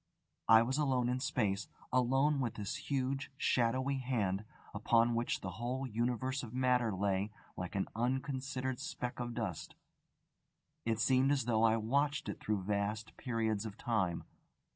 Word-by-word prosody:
_ -, -, -49 dB, 0.5 s
I 110 Hz, 0 st, +9 dB
was 130 Hz, +5 st, -1 dB
alone 130 Hz, -4 st, +2 dB
in 125 Hz, +1 st, 0 dB
space, 105 Hz, -6 st, 0 dB, 0.3 s
alone 135 Hz, +4 st, +3 dB
with 120 Hz, -4 st, -1 dB
this 105 Hz, -2 st, -5 dB
huge, 135 Hz, 0 st, -1 dB
shadowy 130 Hz, +3 st, +1 dB
Hand, 110 Hz, -6 st, -1 dB, 0.3 s
upon 115 Hz, +3 st, +3 dB
which 120 Hz, +1 st, 0 dB
the 95 Hz, -, -4 dB
whole 130 Hz, +3 st, -1 dB
Universe 125 Hz, +3 st, -1 dB
of 120 Hz, 0 st, -8 dB
Matter 125 Hz, -3 st, +3 dB
lay 100 Hz, +1 st, 0 dB, 0.3 s
like 90 Hz, +2 st, -5 dB
an 95 Hz, -, 0 dB
unconsidered 130 Hz, +1 st, -1 dB
speck 135 Hz, -5 st, -4 dB
of 120 Hz, -1 st, -3 dB
dust. -, -, -4 dB, 1.1 s
It 115 Hz, -1 st, 0 dB
seemed 130 Hz, +3 st, +4 dB
as 135 Hz, -5 st, +1 dB
though 110 Hz, -2 st, +2 dB
I 115 Hz, 0 st, +5 dB
watched 140 Hz, +7 st, +1 dB
it -, -, -5 dB
through 105 Hz, -3 st, -1 dB
vast 105 Hz, +2 st, -2 dB
periods 110 Hz, -5 st, -1 dB
of 110 Hz, -1 st, -7 dB
time. 95 Hz, -8 st, 0 dB
120 Hz, 155 wpm, -34 LUFS, 110-130 Hz, 1.1 s, I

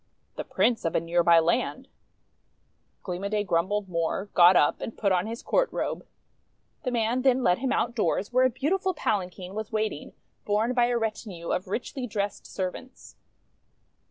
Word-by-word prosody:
"The -, -, -4 dB
Prince 240 Hz, -2 st, +1 dB
of 165 Hz, -, -1 dB
a -, -, +4 dB
near 170 Hz, +1 st, +1 dB
by 170 Hz, 0 st, +6 dB
land." 240 Hz, +10 st, +1 dB, 1.2 s
Gleam 180 Hz, 0 st, -5 dB
o' 200 Hz, -, -1 dB
Day 210 Hz, 0 st, 0 dB
grumbled 195 Hz, +3 st, 0 dB
more, 175 Hz, +3 st, -2 dB
got 180 Hz, +1 st, +7 dB
up 145 Hz, -, +3 dB
and 225 Hz, -, -6 dB
put 200 Hz, -2 st, +1 dB
on 180 Hz, +2 st, +1 dB
his 230 Hz, +2 st, -6 dB
court -, -, +1 dB
robe. -, -, -3 dB, 0.7 s
The 260 Hz, -, -2 dB
man 240 Hz, +1 st, 0 dB
then 260 Hz, -1 st, +3 dB
led 180 Hz, -3 st, +3 dB
him 260 Hz, +1 st, -1 dB
outdoors, 225 Hz, -3 st, 0 dB
where 255 Hz, +1 st, +5 dB
a -, -, -1 dB
beautiful 355 Hz, +9 st, -1 dB
palanquin 185 Hz, -6 st, -2 dB
was 215 Hz, 0 st, -5 dB
waiting, 215 Hz, -1 st, -3 dB, 0.3 s
borne 215 Hz, +4 st, +1 dB
by 240 Hz, -1 st, +3 dB
a 240 Hz, 0 st, +1 dB
retinue 215 Hz, -6 st, -4 dB
of 185 Hz, -, -1 dB
richly 250 Hz, +6 st, -4 dB
dressed 205 Hz, -2 st, -3 dB
servants. 195 Hz, +7 st, -6 dB
210 Hz, 170 wpm, -27 LUFS, 180-245 Hz, 1.2 s, got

